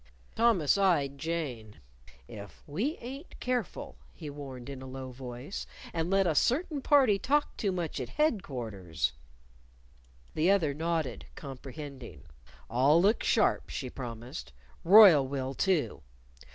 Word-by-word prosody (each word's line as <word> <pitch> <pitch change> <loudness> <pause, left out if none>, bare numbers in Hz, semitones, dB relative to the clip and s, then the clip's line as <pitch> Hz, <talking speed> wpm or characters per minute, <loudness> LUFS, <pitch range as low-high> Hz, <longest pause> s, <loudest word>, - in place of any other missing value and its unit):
Thomas 210 -8 +3
eyed 145 -8 +2
Jane. 135 -11 -4 0.5
"If 100 -1 -11
we 220 - -2
ain't 270 +7 -9
careful," 245 - -3 0.2
he 150 - -7
warned 135 -4 -8
in 135 -2 -7
a 130 - -8
low 130 0 -7
voice, 125 +6 -7 0.3
"and 165 0 -1
let 195 0 +3
a 165 - +2
certain 285 - +1
party 260 -9 +4
talk 290 +6 +1
too 200 -4 -1
much 175 -5 -3
at 125 -2 -4
headquarters 115 - -1 0.6
" - - -30
The 160 +4 +2
other 175 -8 +3
nodded, 160 -4 -2
comprehending 135 - -9 0.4
"I'll 135 +7 +4
look 205 +6 +3
sharp," 215 - +2
she 130 -3 -5
promised. 120 - -7 0.3
"Royle 180 -8 +8
will, 135 -1 -3
too." 150 - 0
145 Hz, 130 wpm, -30 LUFS, 125-195 Hz, 0.6 s, Royle